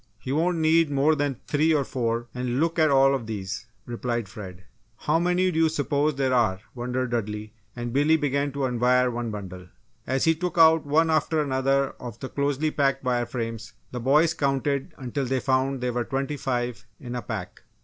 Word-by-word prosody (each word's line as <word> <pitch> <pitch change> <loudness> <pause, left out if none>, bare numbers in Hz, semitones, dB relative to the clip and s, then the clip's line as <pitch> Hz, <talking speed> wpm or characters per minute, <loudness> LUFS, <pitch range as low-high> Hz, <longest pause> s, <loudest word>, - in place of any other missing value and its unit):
"He 130 - -6
won't 170 +4 +1
need 160 0 +3
more 145 +2 +3
than 145 -4 -1
three 155 +2 +2
or 145 - +2
four 120 -2 -2
and 125 0 -2
look 165 +2 +1
at 155 -1 +5
all 135 0 +5
of 125 -5 -3
these," 100 -4 -5 0.2
replied 120 -2 -3
Fred. 95 -3 -10 0.3
"How 155 +2 +1
many 180 +1 +2
do 160 - -1
you 165 -1 +4
s'pose 145 0 0
there 135 -1 +1
are," 110 -7 +2
wondered 125 0 -3
Dudley, 105 -2 -3 0.2
and 120 -1 -4
Billy 150 +4 +4
began 145 -1 0
to 140 - -4
unwire 125 0 +2
one 120 -1 -3
bundle. 95 -4 -7 0.4
As 130 +1 0
he 165 - +4
took 175 +1 -4
out 160 -2 +6
one 160 +3 +3
after 155 0 +1
another 135 -1 +1
of 120 -2 -8
the 130 - -6
closely 145 +2 0
packed 135 -2 +1
wire 120 -2 0
frames 115 -2 -5 0.2
the 125 - -4
boys 150 +7 +3
counted 140 -2 -1
until 135 +1 -3
they 130 +1 0
found 130 0 0
there 125 -1 -1
were 120 0 0
twenty 135 +3 -2
five 125 -3 -3
in 120 -1 -7
a 125 - -3
pack. 105 -7 -6
135 Hz, 195 wpm, -25 LUFS, 120-150 Hz, 0.4 s, out